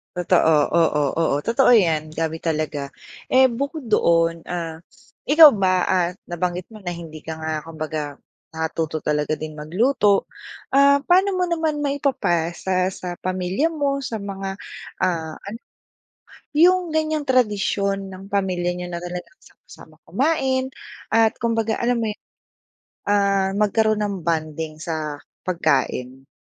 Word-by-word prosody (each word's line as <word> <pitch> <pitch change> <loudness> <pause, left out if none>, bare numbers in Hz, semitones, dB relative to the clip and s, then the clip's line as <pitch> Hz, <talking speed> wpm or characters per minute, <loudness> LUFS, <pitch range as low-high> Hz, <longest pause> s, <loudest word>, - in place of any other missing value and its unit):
Totoo, 175 -2 +3 0.2
oo, 165 -3 +2 0.2
oo, 165 -4 +2
totoo 235 - +4
yan. 160 -8 +2
Dami 160 0 -2
talaga, 155 -3 -2 0.5
eh 260 0 +6
bukod 280 +6 -3
doon 165 -4 +2
ah 165 -2 -4 0.5
ikaw 305 +1 +9
ba 185 -5 +1
ah 180 -1 +2 0.2
nabanggit 175 +1 -3
mo 220 - -12
na 175 - -2
hindi 165 -2 -9
ka 160 - -4
nga 160 0 -2
kumbaga 155 -2 -5 0.4
natuto 160 -1 -2
talaga 150 0 0
din 155 0 -6
magluto 200 - +2 0.4
ah, 280 +1 +5
paano 370 +6 +3
mo 365 -1 0
naman 320 -3 0
maipapasa 190 - 0
sa 180 -1 -6
pamilya 185 - -1
mo 280 -2 -1
sa 225 -3 -4
mga 195 -1 -5 0.9
ano 210 +3 -8 1.0
yung 360 +2 +5
ganyang 310 -2 0
tradisyon 200 -5 +1
ng 190 0 -10
pamilya 185 -3 0
niyo 180 - -5
na 170 - -4
talaga 175 0 -5 0.2
sama-sama - - -17
kumain 265 -3 +1 0.4
at 225 -1 +4
kumbaga 225 -1 +1
alam 240 0 +1
mo 225 - -1 1.0
ah 200 -1 +2
magkaroon 215 +1 +2
ng 200 -2 -2
bonding 155 -1 -2
sa 155 -2 -4 0.3
pagkain? 135 -6 -1
190 Hz, 125 wpm, -22 LUFS, 165-245 Hz, 1.0 s, ikaw